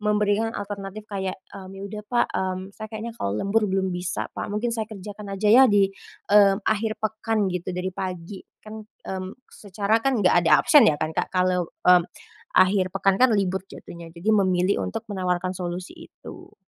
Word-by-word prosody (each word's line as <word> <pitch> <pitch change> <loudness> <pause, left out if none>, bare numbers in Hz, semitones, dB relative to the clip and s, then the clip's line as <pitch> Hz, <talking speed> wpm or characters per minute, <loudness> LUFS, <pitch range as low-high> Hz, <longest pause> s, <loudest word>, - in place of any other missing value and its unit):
memberikan 210 +1 +1
alternatif 200 +1 -6
kayak, 190 -1 -3 0.2
eee, 190 -1 -9
"Ya 195 - -8
udah 210 +1 -7
Pak, 240 -1 +2
mmm, 185 -1 -2 0.2
saya 215 - -6
kayaknya 225 +1 -6
kalau 100 +1 -1
lembur 210 - +1
belum 190 0 0
bisa 180 0 -3
Pak. - - -5
Mungkin 235 +3 -1
saya 220 -2 -3
kerjakan 205 0 -8
aja 210 +2 0
ya 265 +2 +8
di, 200 -2 +3 0.4
eee, 200 -1 +7
akhir 220 0 0
pekan 215 -1 0
gitu 180 0 -4
dari 185 0 -3
pagi," 185 +1 -6 0.2
kan, 220 0 -8
mmm, 190 -3 -7 0.2
secara 205 +2 -1
kan 255 -2 +1
enggak 180 -1 +5
ada 155 -2 +6
absen 295 -7 +7
ya 150 - +1
kan 155 0 -2
Kak, - - 0
kalau, 180 -2 +1 0.2
mmm, 180 -1 +6 0.5
akhir 185 0 +4
pekan 195 0 +2
kan 255 -1 +6
libur 190 -1 0
jatuhnya, 170 -3 -11
jadi 210 +6 0
memilih 185 - +2
untuk 90 - -5
menawarkan 185 -1 -1
solusi 180 0 -5 0.2
itu. - - -13
195 Hz, 180 wpm, -24 LUFS, 185-215 Hz, 0.5 s, ya